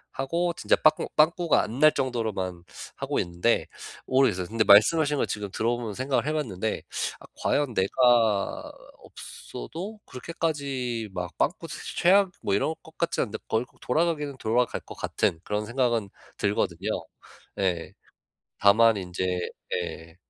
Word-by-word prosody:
하고 170 +6 0
진짜 - - +3
빠꾸 155 0 +3
빵꾸가 170 +2 +3
안 115 +5 -5
날 155 0 +7
정도로만 110 -9 -2 0.3
하고 - - -1
있는데 85 +7 +1 0.4
모르겠어요. 130 -9 +2
근데 110 +2 +1
말씀하신 145 +10 +6
거 - - +1
지금 105 -1 -4
들어보면서 115 0 -1
생각을 130 +3 0
해 155 - 0
봤는데 110 -8 -2 0.4
아 - - -12 0.2
과연 145 -4 +1
내가 110 0 +2 0.3
없어도 190 - -8
그렇게까지 135 -6 -3
막 90 -2 -5
빵꾸 - - -1
사실 - - -7
최악 190 +2 +5
뭐 100 - -1
이럴 155 +10 0
것 160 - -17
같지 170 - 0
않은데 110 -3 -3
거의 110 +2 0 0.2
돌아가기는 150 -1 0
돌아갈 120 +1 0
것 - - -11
같은 80 - -1
그런 105 +1 -2
생각은 120 -3 0 0.3
들거든요. 100 -1 -1 0.7
네. 90 -4 -1 0.7
다만 110 +2 +6
인제 90 -1 -3 0.5
예. 85 -2 -5
120 Hz, 305 characters per minute, -26 LUFS, 100-145 Hz, 0.7 s, 날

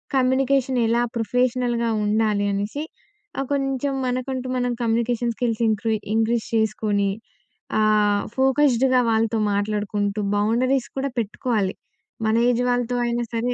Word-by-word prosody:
Communication 260 0 +2
ఎలా 235 +1 +2 0.2
ప్రొఫెషనల్‌గా 240 0 0 0.2
ఉండాలి, 210 -1 +1
అనేసి 205 +9 -3 0.6
ఆహ్, 275 - -1
కొంచెం 275 0 -1
మనకంటూ 255 +1 -3
మనం 245 0 0
కమ్యూనికేషన్ 235 +1 0
స్కిల్స్ 235 -2 -1
ఇంక్రీ 220 +1 0 0.2
ఇంక్రీజ్ 225 +1 +1
చేసుకొని, 215 -2 +1 0.7
ఆహ్, 210 -1 +3
ఫోకస్డ్‌గా 265 -1 +3
వాళ్ళతో 225 0 +1
మాట్లాడుకుంటూ, 205 0 -1 0.2
బౌండరీస్ 245 +5 +1
కూడా 270 0 -1
పెట్టుకోవాలి 215 -2 -1 0.5
మన 220 0 +2
ఏజ్ 245 0 +1
వాళ్ళతో 245 0 0
అయినా 240 0 -1
సరే. 235 +2 0
235 Hz, 115 wpm, -23 LUFS, 215-255 Hz, 0.7 s, ఆహ్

